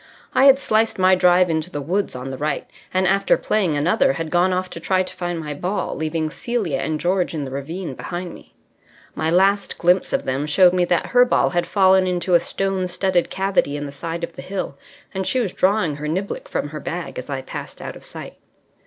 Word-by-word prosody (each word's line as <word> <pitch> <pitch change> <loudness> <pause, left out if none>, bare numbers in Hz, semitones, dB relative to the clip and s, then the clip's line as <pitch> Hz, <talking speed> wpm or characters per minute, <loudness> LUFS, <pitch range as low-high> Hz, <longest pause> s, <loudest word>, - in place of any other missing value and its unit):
I 265 - +5
had 275 -1 +8
sliced 225 -4 +1
my 185 0 +5
drive 180 0 +5
into 160 0 -1
the 145 - -5
woods 180 +6 -1
on 130 +1 -5
the 130 - -5
right, 150 0 -2 0.2
and 185 0 +1
after 195 +2 +3
playing 185 -9 0
another 220 - +2
had 165 -2 -5
gone 180 +2 +3
off 185 0 -1
to - - -6
try 185 +2 +1
to - - -8
find 175 -1 -3
my 150 -2 -5
ball, 180 +8 -3
leaving 155 0 -2
Celia 205 - -2
and 155 +1 -2
George 180 +1 0
in 150 - -2
the 130 - -7
ravine 150 +4 -5
behind 175 +6 -6
me. - - -16 0.6
My 160 - -1
last 195 +4 +2
glimpse 180 +2 +2
of - - -1
them 135 +3 -1
showed 180 +4 +5
me 180 -1 +2
that 175 0 +1
her 245 0 +7
ball 250 - +2
had 175 -1 0
fallen 190 -1 +4
into 180 0 -1
a 170 - +7
stone 195 0 -1
studded 180 0 0
cavity 190 -7 0
in 145 - -4
the 140 - -6
side 165 +4 -5
of 170 - -4
the - - -8
hill, 190 -7 -4 0.4
and 190 0 -2
she 260 - +1
was 210 -7 -1
drawing 185 -6 +1
her 150 +1 -5
niblick 200 - -3
from - - -2
her - - -6
bag - - -5
as - - -9
I - - -3
passed - - -8
out - - -7
of - - -13
sight. - - -9
180 Hz, 225 wpm, -21 LUFS, 160-195 Hz, 0.6 s, had